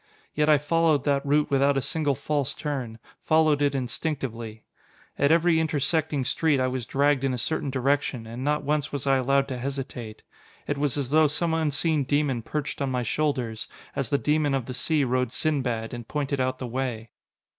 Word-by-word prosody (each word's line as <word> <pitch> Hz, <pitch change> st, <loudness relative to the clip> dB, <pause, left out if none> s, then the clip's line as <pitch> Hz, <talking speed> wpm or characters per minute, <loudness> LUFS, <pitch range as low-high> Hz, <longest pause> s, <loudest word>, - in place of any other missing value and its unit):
Yet 150 Hz, +1 st, +1 dB
I 150 Hz, -, +7 dB
followed 155 Hz, -1 st, +2 dB
that 140 Hz, -1 st, +1 dB
route 145 Hz, +1 st, +1 dB
without 140 Hz, 0 st, +3 dB
a -, -, +4 dB
single 145 Hz, -1 st, 0 dB
false 145 Hz, 0 st, -1 dB
turn, 130 Hz, -7 st, -4 dB, 0.3 s
followed 155 Hz, -2 st, +3 dB
it 140 Hz, -1 st, +2 dB
instinctively. 120 Hz, -4 st, -3 dB, 0.6 s
At 140 Hz, +1 st, +4 dB
every 165 Hz, 0 st, +4 dB
intersecting 155 Hz, -2 st, 0 dB
street 145 Hz, +2 st, +2 dB
I 130 Hz, -, +2 dB
was 130 Hz, -2 st, -3 dB
dragged 140 Hz, 0 st, +2 dB
in 135 Hz, -2 st, +1 dB
a -, -, -4 dB
certain 140 Hz, +4 st, -2 dB
direction 135 Hz, -2 st, 0 dB
and 115 Hz, +3 st, -6 dB
not 150 Hz, +1 st, 0 dB
once 150 Hz, 0 st, 0 dB
was 140 Hz, -2 st, -4 dB
I 135 Hz, -1 st, +4 dB
allowed 135 Hz, +1 st, +2 dB
to 130 Hz, -2 st, -4 dB
hesitate. 125 Hz, -4 st, -5 dB, 0.4 s
It 145 Hz, -1 st, -2 dB
was 145 Hz, -1 st, 0 dB
as 135 Hz, -3 st, -2 dB
though 155 Hz, +1 st, +5 dB
some 160 Hz, +3 st, -1 dB
unseen 155 Hz, -1 st, +1 dB
demon 140 Hz, -3 st, 0 dB
perched 150 Hz, +5 st, -4 dB
on 140 Hz, -, 0 dB
my 125 Hz, -1 st, -1 dB
shoulders, 125 Hz, -4 st, -1 dB, 0.3 s
as 135 Hz, -4 st, -2 dB
the 140 Hz, -, +2 dB
demon 150 Hz, -1 st, +1 dB
of 130 Hz, -3 st, -2 dB
the 130 Hz, -, -6 dB
sea 150 Hz, +4 st, +1 dB
rode 125 Hz, -1 st, 0 dB
Sinbad, 125 Hz, -7 st, -1 dB
and 120 Hz, -1 st, -7 dB
pointed 140 Hz, -2 st, -2 dB
out 130 Hz, 0 st, 0 dB
the 130 Hz, -, -5 dB
way. 120 Hz, -2 st, -4 dB
140 Hz, 190 wpm, -26 LUFS, 130-150 Hz, 0.6 s, I